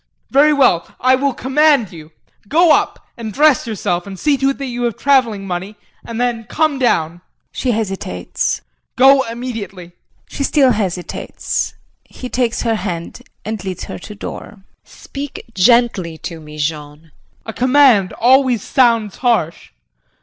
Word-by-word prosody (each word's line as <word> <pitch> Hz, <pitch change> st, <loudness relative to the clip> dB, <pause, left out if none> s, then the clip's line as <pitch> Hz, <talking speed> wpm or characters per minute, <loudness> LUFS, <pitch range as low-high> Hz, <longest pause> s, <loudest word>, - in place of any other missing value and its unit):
Very 290 Hz, +3 st, +5 dB
well 260 Hz, -, +2 dB
I 255 Hz, +1 st, +3 dB
will 275 Hz, +2 st, +1 dB
command 270 Hz, -, +2 dB
you! 155 Hz, -2 st, -12 dB, 0.4 s
Go 330 Hz, -, +4 dB
up -, -, 0 dB
and 225 Hz, -2 st, -6 dB
dress 295 Hz, 0 st, +3 dB
yourself 180 Hz, -4 st, -2 dB
and 195 Hz, -1 st, -8 dB
see 295 Hz, +7 st, +2 dB
to 270 Hz, +1 st, +1 dB
it 275 Hz, -, -2 dB
that 275 Hz, -, -5 dB
you 245 Hz, -1 st, -5 dB
have 235 Hz, -, -2 dB
travelling 245 Hz, -8 st, +2 dB
money 185 Hz, +3 st, -5 dB, 0.3 s
and 230 Hz, 0 st, -6 dB
then 240 Hz, -2 st, -1 dB
come 310 Hz, 0 st, 0 dB
down. 175 Hz, -9 st, 0 dB, 0.3 s
[She 255 Hz, -, -3 dB
hesitates.] 195 Hz, -, -2 dB, 0.3 s
Go 270 Hz, +1 st, +6 dB
immediately. 230 Hz, -7 st, -6 dB, 0.4 s
[She 280 Hz, -, -4 dB
still 275 Hz, -2 st, +3 dB
hesitates. 190 Hz, -5 st, -3 dB, 0.3 s
He 250 Hz, -, -9 dB
takes 245 Hz, -2 st, -1 dB
her 230 Hz, -1 st, +1 dB
hand 175 Hz, -4 st, -5 dB, 0.2 s
and 215 Hz, -2 st, -4 dB
leads 190 Hz, -2 st, -5 dB
her -, -, -7 dB
to 210 Hz, +3 st, -10 dB
door.] -, -, -6 dB
JULIE. 205 Hz, -, -18 dB, 0.2 s
Speak 285 Hz, 0 st, -8 dB
gently 200 Hz, -6 st, +2 dB
to 165 Hz, +1 st, -7 dB
me, 150 Hz, -1 st, -12 dB
Jean. 150 Hz, 0 st, -4 dB
JEAN. 160 Hz, -1 st, -25 dB, 0.3 s
A 225 Hz, -, -6 dB
command 255 Hz, -7 st, +4 dB
always 255 Hz, -2 st, +3 dB
sounds 230 Hz, -5 st, +2 dB
harsh. 230 Hz, -10 st, 0 dB
230 Hz, 155 wpm, -17 LUFS, 185-265 Hz, 0.4 s, Go